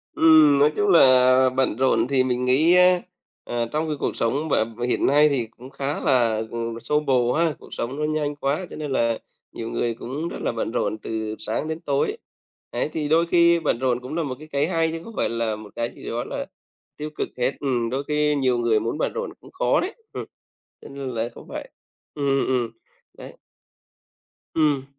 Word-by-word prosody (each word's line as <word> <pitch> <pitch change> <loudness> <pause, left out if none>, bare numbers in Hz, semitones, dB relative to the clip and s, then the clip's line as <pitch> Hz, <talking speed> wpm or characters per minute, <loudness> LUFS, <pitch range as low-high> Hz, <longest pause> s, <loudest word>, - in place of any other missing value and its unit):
Ừm, 155 -3 +6
nói 150 +2 +5
chung 205 -1 +1
là 130 -5 +6
bận 130 -3 0
rộn 130 -1 +2
thì 130 -2 +3
mình 125 0 -1
nghĩ 150 +7 +4
á, 180 0 +5 0.4
à, 120 -1 -1
trong 155 +1 -1
cái 150 - -1
cuộc - - -2
sống 140 +7 -1
b - - 0 0.3
hiện - - +1
nay 150 +2 +5
thì 125 -5 -1
cũng 130 +2 -11
khá 140 +2 -3
là, 115 -5 +2
ừm, 115 0 -4
xô 150 +5 +1
bồ 125 -4 +2
ha. 165 -1 +2
Cuộc - - -13
sống 130 +4 -4
nó - - -1
nhanh 150 -1 -1
quá 145 +6 -1
cho - - -9
nên 150 -2 -5
là 115 -3 +1 0.3
nhiều 115 0 -6
người 120 -1 -1
cũng 135 +8 -5
rất - - -6
là - - 0
bận 115 -1 -3
rộn 110 -2 -1
từ 110 0 -4
sáng 110 +7 -2
đến 160 +1 -3
tối. 140 -4 0 0.5
Đấy, 120 - -1
thì 155 -2 -2
đôi 165 +2 +4
khi 170 0 +4
bận 145 -7 0
rộn 125 -2 +1
cũng 130 +5 -6
là 170 - 0
một 135 -4 -4
cái 155 - -11
cái 145 0 0
hay, 165 -2 +1
chứ 165 0 -5
không 230 - -10
phải - - +1
là 115 -2 -1
một 105 -1 -11
cái 115 0 -2
gì - - -8
đó 120 +1 -2
là - - -5 0.5
tiêu 150 +1 -5
cực - - -2
hết. 125 +1 +1
Ừm, 125 -5 0
đôi 135 +3 -2
khi 150 0 +1
nhiều 130 -3 +1
người 115 -2 +2
muốn 115 +7 -3
bận - - -1
rộn 480 +1 -4
cũng - - -15
khó - - +1
đấy. 380 +5 -2 0.2
Ừm, - - -5 0.6
cho - - -11
nên 140 -1 -6
là 125 - -6
đấy 115 +1 -1
cũng - - -12
vậy. - - -7 0.4
Ừm, 145 -2 -3
ừm, 135 0 +2
ừm, 125 -3 0 0.5
đấy. - - -11 1.2
Ừm. 145 -4 +2
135 Hz, 220 wpm, -23 LUFS, 120-155 Hz, 1.2 s, Ừm